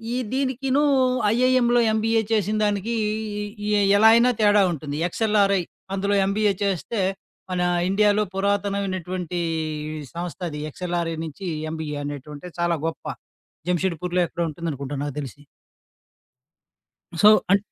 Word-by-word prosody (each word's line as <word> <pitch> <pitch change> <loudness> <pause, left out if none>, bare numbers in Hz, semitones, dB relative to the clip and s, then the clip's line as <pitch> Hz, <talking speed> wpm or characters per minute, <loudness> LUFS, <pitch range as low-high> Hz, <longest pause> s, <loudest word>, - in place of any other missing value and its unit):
ఈ - - 0 0.2
దీనికిను 270 +1 +1 0.5
ఐఐఎంలో 245 -1 +3
ఎంబీఏ 225 +1 +2
చేసినదానికి, 210 +1 0 0.7
ఈ - - 0 0.3
ఎలా 220 +2 +7
అయినా 245 +2 +5
తేడా 205 -1 +5
ఉంటుంది. 145 -1 -5
ఎక్స్ఎల్ఆర్ఐ 200 -2 +2 0.3
అందులో 200 +1 0
ఎంబీఏ 205 +1 +2
చేస్తే 200 +3 -1 0.5
మన 180 -1 0 0.3
ఇండియాలో 210 +1 +3
పురాతనమైనటువంటి, 190 -3 -2 0.6
ఈ - - -7
సంస్థ 175 +1 -5
అది 150 0 -5
ఎక్స్ఎల్ఆర్ఐ 170 -1 -2
నుంచి 160 +5 -7 0.2
ఎంబీఏ 155 -2 -4
అనేటువంటేది 145 +4 -8
చాలా 170 -1 +1
గొప్ప. 165 - -6 0.6
జంషేడ్పూర్లో 180 0 0
ఎక్కడ 170 +2 -5
ఉంటుందనుకుంటా 145 -3 -5
నాకు 145 -2 -4
తెలిసి. 140 0 -7 1.8
సో, 210 - +7 0.2
అం 200 - +7
195 Hz, 110 wpm, -23 LUFS, 165-215 Hz, 1.8 s, ఎలా